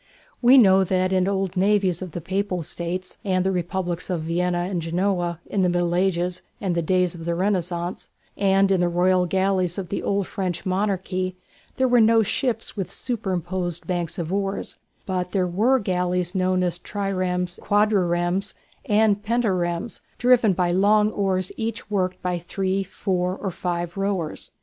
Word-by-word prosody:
We 250 +2 +7
know 195 -5 +6
that 185 0 +1
in 185 -1 +3
the 195 - 0
old 190 -1 -1
navies 190 -2 +2
of 180 -4 -6
the 175 - -4
Papal 190 0 -2
States 175 +3 -5
and 185 -2 +1
the 190 - +2
Republics 180 0 -2
of 175 -3 -1
Venice 175 +2 -1
and 175 -3 -1
Genoa 175 0 -1
in 200 - -1
the 180 - +3
Middle 175 -1 0
Ages 180 -1 0 0.2
and 190 -3 -1
the 170 - 0
days 180 +1 +1
of 165 -2 -9
the 170 0 0
Renaissance, 180 -2 -2 0.3
and 195 0 +3
in 190 -2 +3
the 175 - +2
royal 180 +1 +2
galleys 190 -1 +1
of 185 -3 -4
the 200 - -2
old 200 -1 0
French 185 -3 -3
monarchy, 185 -1 -1 0.4
there 260 - +3
were 245 -1 +5
no 225 0 +5
ships 225 +2 -2
with 195 -4 -4
superposed 185 -6 -3
banks 175 -3 -2
of 170 +1 -3
oars, 195 0 -2 0.3
but 180 -2 -2
there 190 -3 +2
were 215 +9 +2
galleys 180 -4 -1
known 185 -1 +1
as 175 -1 -1
"triremes," 185 -3 -2
"quadriremes," 195 -2 +1 0.3
and 210 -1 +3
"pentaremes," 195 -5 -1 0.2
driven 245 -4 +4
by 175 -1 +1
long 210 +4 +4
oars 190 -3 -1
each 225 -1 -4
worked 185 -2 0
by 180 -1 -1
three, 190 +3 -1
four, 185 -2 -2
or 195 -1 -4
five 175 -1 -3
rowers. 195 -5 -2
185 Hz, 170 wpm, -23 LUFS, 175-195 Hz, 0.4 s, We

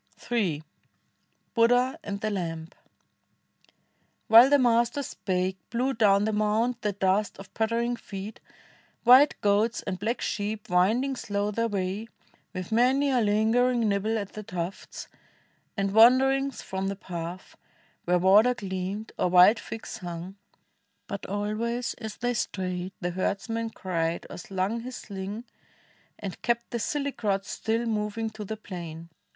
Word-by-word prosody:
Ill 185 -11 +1 0.9
BUDDH.A. 245 +2 +3
AXD 200 0 -5
THE 215 - 0
LAilB 165 -3 -4 1.6
While 230 +4 +9
the 285 - +6
Master 240 +1 +2
spake 185 -5 -2
Blew 250 +4 0
down 205 -3 +4
the 220 - 0
mount 220 +3 +1
the 210 -2 -1
dust 195 +1 0
of 195 - -12
pattering 230 +2 0
feet, 205 -1 -8 0.6
White 255 +4 +7
goats 210 +3 +2
and 185 - -4
black 225 +5 -1
sheep 210 0 -3
winding 225 +10 +2
slow 205 -3 -2
their 230 +2 0
way, 200 +1 -3 0.4
With 185 +1 -6
many 260 +5 +3
a 250 -2 +3
lingering 225 +3 +2
nibble 210 +2 0
at 200 -2 -5
the 215 - -6
tufts, 180 -2 -6 0.7
And 195 0 0
wanderings 265 +3 +5
from 190 0 -3
the 195 - -2
path, 175 -1 -7 0.5
where 180 +1 +3
water 205 +7 +5
gleamed 195 0 -4
Or - - +2
wild 180 +5 +7
figs 225 +1 -7
hung. 175 0 -7 0.7
But 200 -1 -6
always 215 +4 -2
as 220 -3 -6
they 245 +1 -1
strayed 185 -4 -3
The 175 0 -1
herdsman 225 +5 -2
cried, 170 -5 -2
or - - -7
slung 190 +5 -2
his 250 +2 -7
sling, 200 +2 -6 0.7
and 195 -3 -7
kept 235 0 -1
The 235 - -2
silly 280 +5 -1
crowd 200 -5 -1
still 225 +2 -2
mo\'ing 220 0 -2
to 215 0 -7
the 220 +2 -5
plain. 170 -5 -8
210 Hz, 140 wpm, -27 LUFS, 190-235 Hz, 1.6 s, While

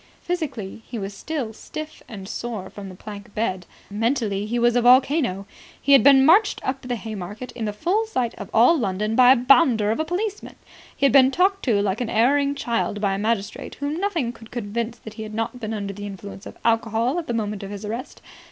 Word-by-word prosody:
Physically, 265 - -4
he 240 - -6
was 200 -1 -5
still 265 -2 -4
stiff 310 +7 -8
and 195 -4 -9
sore 215 -4 -5
from 200 -2 -8
the 185 - -10
plank 205 +1 -10
bed. 190 -5 -2 0.2
Mentally, 215 -2 -1
he 235 +2 -1
was 240 0 +3
a 245 - +4
volcano. 250 - +4 0.3
He 280 - 0
had 275 - +8
been 270 -1 +7
marched 405 +7 +5
up 265 +1 -2
the 250 -1 -3
Haymarket 215 +1 -7
in 230 -2 -5
the 210 - -1
full 380 - 0
sight 250 - -1
of 200 - -9
all 240 +9 +5
London 215 - -1
by 250 +1 +7
a - - +8
bounder 245 -4 +4
of 225 - -1
a - - +2
policeman. 390 +5 -4 0.4
He 275 - +1
had 275 - +4
been 265 -2 +7
talked 385 +6 +1
to 210 -6 +2
like 205 +3 -1
an 240 - -2
erring 280 +6 +2
child 230 -5 -1
by 200 -2 +1
a 195 - -2
magistrate 215 -1 -2
whom 285 +2 -3
nothing 340 - -1
could 225 -1 -14
convince 235 +1 -4
that 220 -1 -11
he 220 - -8
had 215 0 -7
not 225 +2 -3
been 220 -2 -4
under 200 -2 -4
the 205 +1 -7
influence 195 0 -9
of - - -11
alcohol 230 +5 +1
at 330 - -7
the 240 - -2
moment 210 -2 -2
of 195 - -7
his 205 +1 -7
arrest. 230 +5 -6
230 Hz, 220 wpm, -23 LUFS, 210-270 Hz, 0.4 s, had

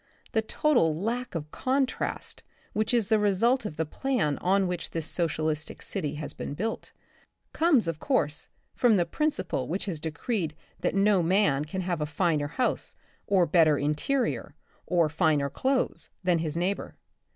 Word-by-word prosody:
The 220 - +2
total 220 - +2
lack 235 +3 -2
of 155 -2 -4
contrast 265 0 -1 0.3
which 215 +1 0
is 235 -5 +2
the 220 - +4
result 210 +4 +2
of 155 - -8
the 160 - 0
plan 155 - -1
on 195 +2 +2
which 180 -1 -3
this 165 -2 -3
socialistic 155 -2 -2
city 150 -1 -3
has 150 0 -5
been 140 - -5
built, 220 +7 -3 0.6
comes, 310 - +3
of 165 -2 -2
course, 155 - 0 0.3
from 235 -4 +4
the 175 - +2
principle 185 - -1
which 185 +5 -2
has 175 -6 -3
decreed 160 +2 -2 0.2
that - - -1
no 200 -1 +4
man 170 -5 +2
can 185 +5 -4
have 175 -3 -2
any 150 - 0
finer 150 -1 +1
house 245 - -2 0.3
or 190 -3 +4
better 155 -2 +4
interior, 150 - -1 0.3
or 170 -3 +3
finer 150 -3 +1
clothes 265 0 0
than 175 -2 +3
his 160 -1 -2
neighbor. 185 +4 -2
180 Hz, 160 wpm, -28 LUFS, 155-220 Hz, 0.6 s, the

